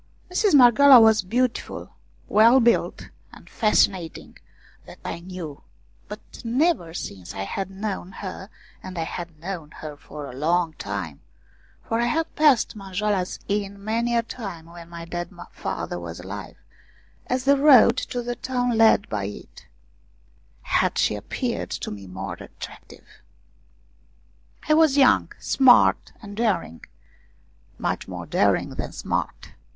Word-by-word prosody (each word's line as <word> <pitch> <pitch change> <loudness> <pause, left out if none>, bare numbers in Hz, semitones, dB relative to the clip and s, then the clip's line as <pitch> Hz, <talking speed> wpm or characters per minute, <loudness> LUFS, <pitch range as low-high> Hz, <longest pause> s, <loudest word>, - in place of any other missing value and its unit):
Mistress 375 -1 +3
Marghioala 260 +1 +8
was 220 -1 +5
beautiful, 240 +6 -2 0.4
well 230 +5 +6
built 235 -1 +1 0.2
and - - -15
fascinating, 195 -6 0 0.5
that - - -12
I - - -4
knew; 170 -5 -8 0.5
but 210 +1 -7 0.2
never 245 - +1
since 95 - -7
I 95 - -3
had 190 - -4
known 195 -1 -5
her 190 0 -7 0.3
and 185 -1 -8
I 165 - -1
had 170 -1 -7
known 170 -3 -6
her 155 -1 -8
for 145 0 -9
a 130 - -9
long 165 +4 0
time, 95 -8 -5 0.6
for 225 - -2
I - - +2
had 325 +5 -1
passed 290 -9 +3
Manjoala's 195 -1 -2
Inn 200 -1 -3
many 235 +2 0
a 230 - +2
time 195 -8 -8
when 170 0 -12
my 170 -1 -8
dead 175 0 -5 0.2
father 90 - -4
was 85 0 -8
alive, 95 +2 -8 0.7
as 255 0 -1
the 280 +1 +5
road 275 -5 +6
to 245 -1 -3
the 240 0 -3
town 245 -2 -1
led 220 -2 +4
by 100 -2 -3
it 100 - -10 1.0
had - - +1
she - - +2
appeared - - -4
to - - -5
me 100 -2 -9
more 95 +2 -6
attractive. - - -11 1.6
I 305 - +4
was 310 -3 +4
young, 270 -3 +4
smart 255 -2 +4
and 205 -1 -9
daring, 195 - -1 0.9
much - - -3
more - - -7
daring - - +1
than - - -6
smart. - - -4
200 Hz, 140 wpm, -24 LUFS, 165-240 Hz, 1.6 s, Marghioala